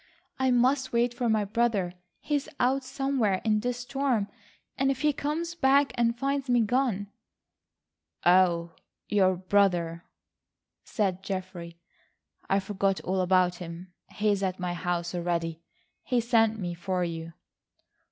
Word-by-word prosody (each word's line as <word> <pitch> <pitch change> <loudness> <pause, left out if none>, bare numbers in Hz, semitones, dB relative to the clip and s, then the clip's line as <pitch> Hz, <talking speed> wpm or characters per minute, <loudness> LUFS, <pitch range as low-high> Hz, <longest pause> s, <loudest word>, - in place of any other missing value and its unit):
"I 260 0 +2
must 260 +2 +2
wait 240 +1 +2
for 240 -1 -1
my 215 -2 +2
brother. 210 -4 0 0.3
He's 290 -2 -1
out 265 +2 +2
somewhere 255 -8 0
in 215 -1 +3
this 245 +2 -2
storm, 250 -5 -1 0.5
and 270 0 +1
if 270 -1 -1
he 300 -1 +3
comes 315 +5 -2
back 280 -3 +3
and 235 0 +1
finds 275 +1 -1
me 245 -1 +4
gone—" 220 -4 0 1.1
"Oh, 175 -2 +4 0.4
your 190 -3 +3
brother," 180 -3 +1 0.8
said 195 -5 -1
Geoffrey, 185 -3 -6 0.7
"I 195 - +3
forgot 195 0 -1
all 190 +1 -1
about 180 -1 +3
him. 175 +1 -9 0.2
He's 205 -2 0
at 190 -1 -2
my 180 -1 -2
house 175 0 -2
already. 170 -2 -2 0.4
He 250 -3 0
sent 225 -2 +3
me 175 -4 -3
for 180 +1 -2
you." 165 -1 -5
205 Hz, 135 wpm, -28 LUFS, 180-250 Hz, 1.1 s, me